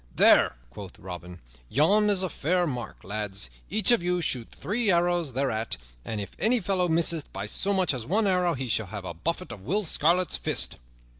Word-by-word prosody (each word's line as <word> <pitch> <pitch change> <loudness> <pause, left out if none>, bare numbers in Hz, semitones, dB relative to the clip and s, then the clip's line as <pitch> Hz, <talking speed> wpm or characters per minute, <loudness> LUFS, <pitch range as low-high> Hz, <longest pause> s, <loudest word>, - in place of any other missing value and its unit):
"There," - - +5
quoth 95 +5 -10
Robin, 90 -1 -9 0.3
"yon 205 +9 +4
is 195 -2 +2
a 185 - -1
fair 175 +4 +1
mark, 125 -6 -5
lads. 100 -10 -4 0.2
Each 215 +4 +3
of 240 - +4
you 180 +1 0
shoot 125 -8 -2
three 220 +2 -2
arrows 175 -5 +2
thereat; 115 - -1 0.3
and 110 - -4
if 100 - -5
any 235 +4 +3
fellow 185 -2 +1
misseth 165 -1 +1
by 100 +1 -5
so 190 - 0
much 190 -5 +2
as 125 -3 -3
one 205 - +1
arrow, 180 -3 +2
he 130 0 -4
shall 110 -2 0
have 100 0 -7
a 85 - -5
buffet 170 - -3
of 110 -4 -9
Will 195 - -1
Scarlet's 175 +1 +2
fist." - - -2
165 Hz, 195 wpm, -27 LUFS, 110-185 Hz, 0.3 s, There